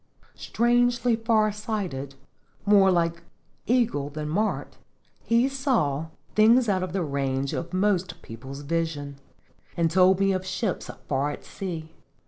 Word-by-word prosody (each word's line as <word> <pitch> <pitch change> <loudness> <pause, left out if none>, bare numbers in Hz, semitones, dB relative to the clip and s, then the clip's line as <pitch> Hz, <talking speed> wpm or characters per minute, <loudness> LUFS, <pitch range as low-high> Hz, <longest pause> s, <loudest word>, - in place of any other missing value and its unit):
Strangely 240 0 +2
far 225 -2 +2
sighted, 195 - -4 0.5
more 200 -2 +6
like 170 -2 +1 0.5
eagle 230 - +1
than 150 +1 -5
mart, 210 +7 -2 0.4
he 235 +3 +2
saw 235 - 0 0.3
things 230 +3 +5
out 190 -3 +1
of 185 -2 -3
the 190 -1 -1
range 140 -2 -1
of 170 0 -4
most 185 -1 0
people's 130 +5 -9
vis 165 +1 -1
ion, 140 -1 -8 0.6
and 165 -1 +2
told 185 +1 +5
me 195 0 +3
of 185 -1 -1
ships 185 +1 -3 0.2
far 140 +1 0
at 145 - -7
sea. 165 -5 -6
185 Hz, 135 wpm, -26 LUFS, 150-215 Hz, 0.6 s, more